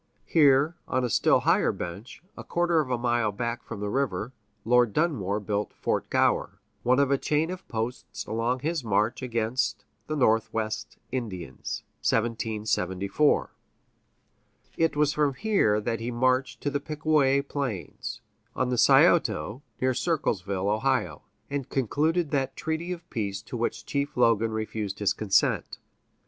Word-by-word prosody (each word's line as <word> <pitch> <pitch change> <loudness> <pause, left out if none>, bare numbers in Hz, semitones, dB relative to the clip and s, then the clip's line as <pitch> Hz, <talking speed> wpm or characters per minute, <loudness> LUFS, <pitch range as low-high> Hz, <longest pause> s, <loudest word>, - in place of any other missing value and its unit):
Here, 145 +1 +4
on 130 0 0
a 120 - -1
still - - +4
higher - - +3
bench, 100 - -7
a - - -8
quarter 175 -1 +1
of 145 -4 -1
a 125 - +1
mile 120 -2 +1
back 115 +3 -3
from 100 - -7
the 105 - -2
river, 125 -3 -1 0.3
Lord 120 -2 +4
Dunmore 110 - 0
built 105 0 -2
Fort - - -1
Gower, - - +1 0.2
one 125 +1 +3
of 140 -1 +3
a 140 - +3
chain 155 +3 0
of 185 0 -8
posts 115 +3 -4
along 120 +3 -1
his 160 -1 -1
march 110 +2 +1
against 115 -1 -1 0.2
the 155 - -2
Northwest 110 -3 0
Indians 95 - -5 0.2
(1774). 110 +1 0 1.2
It 165 -2 +1
was 150 0 +2
from 145 -3 +1
here 195 - +2
that 115 +1 -2
he 115 +2 -3
marched 130 +2 +1
to 145 - -1
the 145 - 0
Pickaway 150 -2 +2
Plains, 135 -10 -4 0.3
on 130 - 0
the 125 -2 0
Scioto 115 +1 +4 0.2
(near 130 0 +2
Circleville, 100 - -1 0.2
O.), 135 -2 0 0.3
and 140 -2 -4
concluded 150 +6 0
that 135 -2 0
treaty 160 +3 -3
of 175 -1 -6
peace 100 -3 -3
to 115 - -8
which 120 0 -2
Chief 140 0 -2
Logan 115 -2 +3
refused 110 -2 -3
his 105 -1 +1
consent. 100 -2 +1
125 Hz, 145 wpm, -27 LUFS, 110-145 Hz, 1.2 s, Here